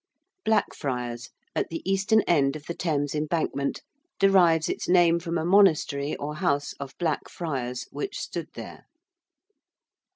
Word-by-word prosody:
~Blackfriars~, 125 Hz, -, -1 dB, 0.3 s
at -, -, -1 dB
the 165 Hz, -, -5 dB
eastern 195 Hz, +3 st, +3 dB
end 140 Hz, -7 st, +2 dB
of 150 Hz, -1 st, -8 dB
the 170 Hz, -, -4 dB
Thames 145 Hz, -5 st, -1 dB
Embankment, 150 Hz, -2 st, -1 dB, 0.3 s
derives 175 Hz, -5 st, +4 dB
its -, -, -3 dB
name 175 Hz, -2 st, +5 dB
from 170 Hz, 0 st, -3 dB
a 160 Hz, -, -1 dB
monastery 160 Hz, -7 st, +3 dB
or 150 Hz, +1 st, -5 dB
house 145 Hz, -5 st, 0 dB
of 140 Hz, -1 st, -8 dB
Black 165 Hz, -4 st, -1 dB
Friars 130 Hz, -7 st, -4 dB
which 405 Hz, 0 st, -4 dB
stood -, -, -5 dB
there. -, -, -9 dB
160 Hz, 135 wpm, -26 LUFS, 140-175 Hz, 0.3 s, name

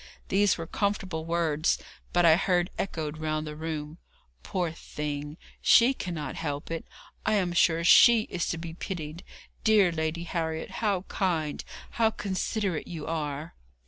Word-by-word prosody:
These 200 Hz, 0 st, +3 dB
were 165 Hz, -, -4 dB
comfortable 190 Hz, -4 st, -2 dB
words, 165 Hz, -2 st, +1 dB, 0.3 s
but 175 Hz, -1 st, +3 dB
I 160 Hz, -1 st, +8 dB
heard 180 Hz, 0 st, +1 dB
echoed 155 Hz, -5 st, -3 dB
round 155 Hz, 0 st, -1 dB
the 150 Hz, 0 st, -6 dB
room: 155 Hz, 0 st, -5 dB, 0.4 s
'Poor 175 Hz, -, -2 dB
thing! 150 Hz, -1 st, -5 dB, 0.2 s
she 245 Hz, +3 st, +6 dB
cannot 170 Hz, -, -4 dB
help 145 Hz, -1 st, -4 dB
it! 165 Hz, -, -4 dB, 0.4 s
I 215 Hz, -, +2 dB
am 180 Hz, -4 st, +1 dB
sure 170 Hz, -1 st, +3 dB
she 230 Hz, +6 st, +8 dB
is 180 Hz, -5 st, -3 dB
to 165 Hz, -, -1 dB
be 165 Hz, 0 st, -6 dB
pitied! 165 Hz, -2 st, -6 dB, 0.4 s
Dear 210 Hz, -5 st, +5 dB
Lady 160 Hz, +1 st, -2 dB
Harriet, 160 Hz, -2 st, -3 dB
how 200 Hz, -5 st, +1 dB
kind, 165 Hz, -7 st, -1 dB, 0.3 s
how 225 Hz, -1 st, +3 dB
considerate 195 Hz, -3 st, -2 dB
you 160 Hz, -4 st, -6 dB
are!' 155 Hz, -1 st, -3 dB
165 Hz, 145 wpm, -28 LUFS, 155-185 Hz, 0.4 s, I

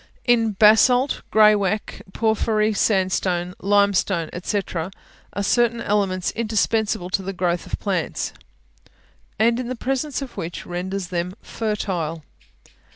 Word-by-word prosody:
In 230 Hz, -3 st, +3 dB
basalt, 235 Hz, +6 st, +4 dB
graywacke, 210 Hz, -1 st, +3 dB
porphyry, 220 Hz, 0 st, +1 dB
sandstone, 185 Hz, -3 st, +1 dB
limestone, 200 Hz, -4 st, +2 dB
&c., 205 Hz, -, -1 dB, 0.2 s
are 190 Hz, +3 st, -6 dB
certain 235 Hz, +2 st, +2 dB
elements 195 Hz, -4 st, 0 dB
indispensable 215 Hz, -4 st, 0 dB
to 195 Hz, -, +1 dB
the 195 Hz, +1 st, -5 dB
growth 175 Hz, -1 st, -1 dB
of -, -, -3 dB
plants, 190 Hz, -4 st, -2 dB, 1.0 s
and 230 Hz, +2 st, +3 dB
the 255 Hz, 0 st, -3 dB
presence 270 Hz, +3 st, -2 dB
of 260 Hz, -, -10 dB
which 170 Hz, -2 st, -5 dB
renders 180 Hz, +1 st, -4 dB
them 180 Hz, +1 st, -3 dB
fertile. 180 Hz, -8 st, -3 dB
200 Hz, 110 wpm, -22 LUFS, 185-225 Hz, 1.0 s, basalt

